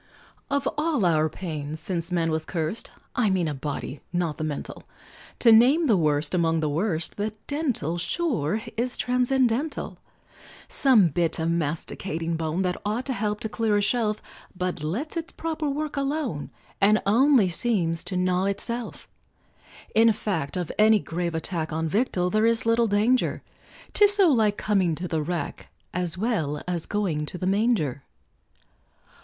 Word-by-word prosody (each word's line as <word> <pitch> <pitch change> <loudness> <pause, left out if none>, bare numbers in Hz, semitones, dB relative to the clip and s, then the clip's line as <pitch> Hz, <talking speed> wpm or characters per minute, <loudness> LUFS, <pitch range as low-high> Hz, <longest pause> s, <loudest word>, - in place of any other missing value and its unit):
Of 280 0 0
all 300 - +1
our 155 -2 +3
pains, 155 -3 -5
since 170 +1 -3
man 165 -2 +1
was 160 0 -1
curst, 165 +6 -3 0.3
I 230 -4 +2
mean 185 -3 +1
of 145 -3 -5
body, 145 -1 -4
not 175 -4 -1
the - - -3
mental, 150 -2 -5 0.6
To 230 - +5
name 260 +9 +6
the 230 -8 +4
worst, 150 -2 +1
among 165 -2 +2
the 155 -1 0
worst, 165 0 -1
The 210 +1 -2
dental 255 - -1
sure 215 - -1
is 245 +2 -2
transcendental; 250 +2 0 0.7
Some 230 -10 +5
bit 165 +2 0
of 165 +1 0
masticating 165 +1 -2
bone, 160 +3 -1
That 180 -1 -2
ought 215 +5 -2
to 265 - -1
help 210 -1 -2
to 225 - -1
clear 215 -1 +1
a - - +2
shelf, 215 0 0 0.3
But 180 -3 -2
lets 240 - -3
its 330 0 -4
proper 320 -2 -3
work 300 +2 -3
alone, 275 - -2 0.3
And 210 +2 +5
only 240 +1 +5
seems 170 -4 0
to 185 - -3
gnaw 180 +1 +1
itself; 230 +4 -3 0.9
In 225 +1 +6
fact, 185 -8 -3
of 175 -3 -3
any 215 0 +6
grave 170 -3 -3
attack 160 0 -3
On 160 +1 -1
victual 180 -2 0
there 215 +1 +3
is 230 0 +1
little 230 0 +3
danger, 220 +5 +1 0.5
'Tis 410 -1 +5
so 390 -4 +5
like 220 -7 +3
coming 190 -6 +1
to 180 +3 -4
the 160 -2 -1
rack, 170 +2 -4 0.2
As 180 -2 -1
well 175 -9 -1
as 175 -2 -2
going 170 -8 -1
to 180 - -5
the 185 - -4
manger. 195 - +1
195 Hz, 160 wpm, -25 LUFS, 165-235 Hz, 0.9 s, name